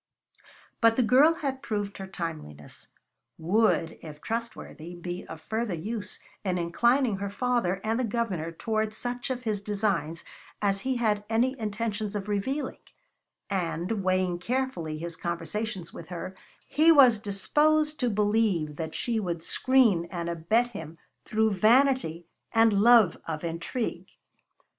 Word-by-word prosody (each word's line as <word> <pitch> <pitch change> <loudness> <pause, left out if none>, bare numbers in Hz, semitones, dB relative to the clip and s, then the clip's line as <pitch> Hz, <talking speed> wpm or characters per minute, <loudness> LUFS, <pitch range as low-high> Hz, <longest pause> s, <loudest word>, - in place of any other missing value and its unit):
But 230 -1 +5
the 250 - +3
girl 275 +8 +5
had 275 -5 -3
proved 205 -6 -3
her 190 - -6
timeliness; 155 - -7 0.5
would, 170 -1 +1
if 150 -2 -10
trustworthy, 220 -6 -5
be 175 +1 -6
of 160 -1 -9
further 220 0 -2
use 205 +4 -4 0.3
in 185 -3 0
inclining 235 +7 +2
her 200 +1 -3
father 220 -4 0
and 225 +2 0
the - - +1
Governor 205 -8 -2
toward 215 +4 -2
such 245 +2 -4
of 250 -1 -3
his 215 -4 -1
designs 195 -6 -1 0.4
as 200 -1 +1
he 260 +5 -1
had 215 -4 +1
any 245 +4 +2
intentions 215 -1 -3
of 205 -1 -3
revealing; 260 +8 -2 0.7
and, 185 +2 -2
weighing 185 -1 +1
carefully 205 -8 -2
his 170 +1 -6
conversations 175 +3 -4
with 165 - -9
her, 180 +1 -6 0.3
he 315 +3 +5
was 255 -8 +7
disposed 300 +10 +1
to 245 - +2
believe 205 -8 +1
that 160 -1 -5
she 235 -2 0
would 170 -5 -3
screen 235 -10 +3
and 170 -2 -4
abet 195 +9 +1
him 165 -6 -8 0.3
through 220 0 +2
vanity 220 - +3 0.3
and 225 -1 +5
love 220 -1 +6
of 155 -1 -4
intrigue. 170 +8 -3
210 Hz, 140 wpm, -27 LUFS, 175-235 Hz, 0.7 s, was